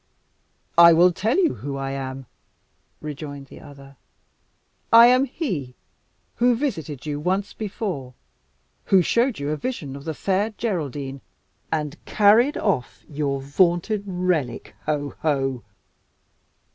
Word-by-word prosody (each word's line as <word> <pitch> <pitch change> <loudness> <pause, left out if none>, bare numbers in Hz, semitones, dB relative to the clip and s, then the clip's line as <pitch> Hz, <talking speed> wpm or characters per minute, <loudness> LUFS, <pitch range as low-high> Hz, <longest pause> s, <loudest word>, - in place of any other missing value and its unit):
"I 170 0 +9
will 175 +2 +6
tell 220 - 0
you 355 -5 +3
who 140 -1 -6
I 135 0 -3
am," 135 -1 -5 0.8
rejoined 145 -1 -7
the - - -12
other. 140 -2 -14 0.9
"I 230 +1 +10
am 255 +2 +5
he 180 - -4 0.6
who 245 0 +4
visited 160 - -4
you 145 -1 -3
once 190 +5 -1
before 185 - -5 0.7
who 190 -2 +4
showed 235 +5 +1
you 145 +1 -3
a 155 - -1
vision 155 - -5
of 140 +1 -10
the 160 -2 -3
Fair 200 +6 -1
Geraldine 145 - -3 0.5
and 155 0 -3
carried 220 +7 +4
off 160 - -2
your 140 -2 -2
vaunted 175 +8 +1
relic 180 -8 -2
ho! 145 -2 -1
ho!" 135 -5 -1
160 Hz, 125 wpm, -23 LUFS, 140-205 Hz, 0.9 s, I